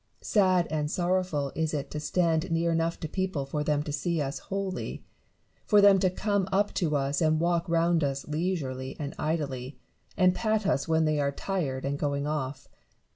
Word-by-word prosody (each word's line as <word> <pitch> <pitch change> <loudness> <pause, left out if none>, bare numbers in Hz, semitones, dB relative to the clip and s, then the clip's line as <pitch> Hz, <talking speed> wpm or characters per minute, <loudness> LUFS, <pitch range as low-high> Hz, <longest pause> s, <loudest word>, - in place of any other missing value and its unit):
Sad 185 -4 +3
and 150 -1 -1
sorrowful 175 -5 0
is 160 -1 -1
it 140 - -4
to 150 - -3
stand 160 +1 +1
near 165 0 +1
enough 165 0 0
to 160 - -2
people 185 -4 -2
for 150 +2 -2
them 150 -1 +1
to 150 - -5
see 170 +3 -1
us 140 -1 -2
wholly; 195 -1 -4 0.6
for 210 - +6
them 200 -1 +7
to 185 0 +3
come 200 0 -1
up 200 +2 +1
to 155 -4 0
us 140 +1 0
and 155 -1 +3
walk 170 0 +1
round 165 -1 +2
us 135 -1 -2
leisurely 150 -5 -2
and 145 -2 -4
idly, 140 -4 -2 0.4
and 185 -1 +5
pat 215 0 0
us 140 -7 +1
when 160 0 +3
they 155 -1 +1
are 140 -1 +1
tired 140 -6 -3
and 140 +1 -2
going 140 -1 -1
off. 145 -2 -3
160 Hz, 185 wpm, -28 LUFS, 145-185 Hz, 0.6 s, them